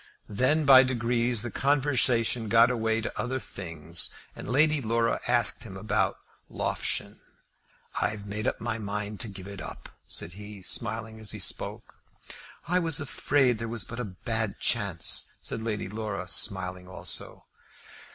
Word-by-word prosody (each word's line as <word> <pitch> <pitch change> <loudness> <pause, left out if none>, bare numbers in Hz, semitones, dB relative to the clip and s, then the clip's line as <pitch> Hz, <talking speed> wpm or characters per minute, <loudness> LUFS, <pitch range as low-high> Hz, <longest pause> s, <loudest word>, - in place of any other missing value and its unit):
Then, 130 +9 +2
by 135 -2 +10
degrees, 120 -2 +1
the 120 - -4
conversation 125 -5 +2
got 115 +3 +6
away 110 -2 0
to - - -5
other 130 +2 -2
things, 85 -6 -1 0.3
and - - -7
Lady 150 +3 +4
Laura 115 0 +1
asked 120 -3 +3
him 95 -4 -8
after 105 0 +1 0.3
Loughshane. - - -2 0.8
"I've 105 -1 -1
made 105 +1 -3
up - - -1
my 115 -1 -2
mind 105 0 -3
to - - -3
give 95 -2 -9
it 100 -1 -8
up," - - -8 0.2
said 85 - -3
he, 105 0 -10
smiling 110 +1 -1
as 110 -2 -2
he - - -5
spoke. - - -2 0.7
"I 180 +2 +3
was 165 -5 +3
afraid 135 -4 +2
there 115 - -3
was 115 -1 -1
but 115 - -7
a 125 - -2 0.2
bad 110 -4 -1
chance," 100 -8 0
said 115 - -5
Lady 110 -3 -2
Laura, 105 -3 -4
smiling 90 -3 0
also. 90 - -1
115 Hz, 150 wpm, -28 LUFS, 100-125 Hz, 0.8 s, by